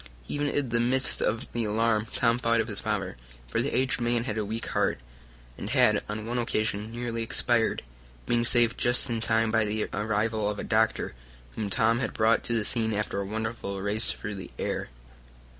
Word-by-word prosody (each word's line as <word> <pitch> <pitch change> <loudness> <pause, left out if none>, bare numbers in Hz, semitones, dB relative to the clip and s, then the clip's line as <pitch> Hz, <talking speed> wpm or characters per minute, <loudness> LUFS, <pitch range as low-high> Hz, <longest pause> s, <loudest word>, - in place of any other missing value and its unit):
Even 145 0 -1
in 140 -3 -1
the 120 - +1
midst 130 +3 +1
of 110 +1 0
the 120 - -1
alarm 110 0 +1
Tom 115 0 +2
thought 115 -1 +2
of 110 - 0
his 105 -3 +3
father, 100 - -2 0.3
for - - 0
the - - -1
aged 125 -1 0
man 120 0 +1
had 110 -4 -3
a 110 - -1
weak 110 +3 -4
heart, - - +1 0.6
and - - -5
had - - +4
on 105 +1 -4
one 120 +2 -2
occasion 110 -2 -1
nearly 120 -1 -3
expired, 115 0 +1 0.4
being 120 0 +1
saved 120 -1 +4
just 120 +1 +2
in 115 -1 -1
time 110 0 +2
by 110 -1 +3
the 105 0 -1
arrival 110 0 0
of 105 - -2
a - - -4
doctor, 110 - +1 0.4
whom 105 -2 -3
Tom 115 +2 +2
brought 110 +1 +3
to 120 - 0
the 110 -2 +1
scene 110 -2 +1
after 100 -1 -2
a - - -3
wonderful 110 -2 -3
race 105 +3 +1
through 105 - -5
the 95 -2 -7
air. - - -3
110 Hz, 195 wpm, -27 LUFS, 105-120 Hz, 0.6 s, had